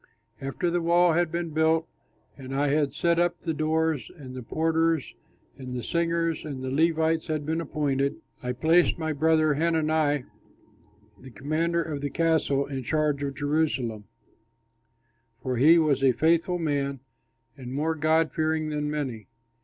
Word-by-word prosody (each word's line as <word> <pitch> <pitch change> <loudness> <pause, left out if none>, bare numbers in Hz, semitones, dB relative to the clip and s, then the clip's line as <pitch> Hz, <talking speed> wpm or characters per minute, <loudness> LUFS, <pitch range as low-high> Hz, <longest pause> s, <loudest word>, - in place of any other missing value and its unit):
After 135 +6 -2
the 175 0 0
wall 170 0 +4
had 170 0 +1
been 170 -1 -3
built 160 +1 +2 0.5
and 135 -1 -7
I 145 +1 +1
had 145 -1 +1
set 170 0 +2
up 175 0 +1
the 165 - -2
doors, 155 -4 0
and 130 -4 -10
the 130 - -6
porters 160 +3 0 0.5
and 130 -1 -6
the 120 - -4
singers 170 -1 -1
and 140 -4 -6
the 130 - -3
Levites 160 +2 +1
had 155 -2 -2
been 160 +2 -1
appointed, 140 -3 -1 0.3
I 125 0 -3
placed 165 +7 +3
my 160 -1 -2
brother 155 +1 +3
Hanani, 155 -2 +1 1.0
the 130 - -12
commander 160 +6 -1
of 150 -3 -5
the 145 - -2
castle, 160 -4 +1
in 135 -2 -5
charge 150 +2 0
of 140 -1 -3
Jerusalem, 145 -8 -1 1.4
for 130 -1 -2
he 155 +7 +6
was 150 -4 +2
a 130 -2 +5
faithful 170 +5 +2
man 140 -5 -2 0.5
and 125 -3 -9
more 150 +4 0
God 160 +1 +2
fearing 155 0 0
than 150 -1 -2
many. 130 -9 -4
155 Hz, 155 wpm, -26 LUFS, 140-165 Hz, 1.4 s, he